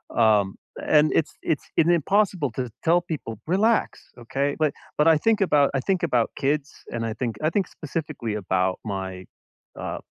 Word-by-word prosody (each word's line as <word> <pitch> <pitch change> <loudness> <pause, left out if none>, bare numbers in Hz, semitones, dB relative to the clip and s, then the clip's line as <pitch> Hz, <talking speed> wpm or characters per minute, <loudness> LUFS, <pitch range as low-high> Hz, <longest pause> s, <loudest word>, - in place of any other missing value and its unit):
Um, 105 -4 +3 0.3
and 150 0 +4
it's 160 - +1
it's 150 - -1
in 165 - +4
impossible 175 - +2
to 125 +1 -4
tell 170 +2 +4
people, 150 -10 -6
"Relax. 215 +6 +1
Okay?" 140 +4 -1
But 155 -2 +2 0.2
but 150 +2 +4
I 160 -2 +6
think 225 +6 +2
about 145 -7 +4
I 135 - +1
think 185 +6 -1
about 125 -8 +1
kids, 145 +1 0 0.2
and 115 -1 -2
I 110 - -2
think 115 -2 -3
I 155 - +2
think 195 0 0
specifically 150 -7 -5
about 95 -2 0
my, 95 -2 -5 0.5
uh, - - -4
145 Hz, 170 wpm, -24 LUFS, 115-165 Hz, 0.5 s, I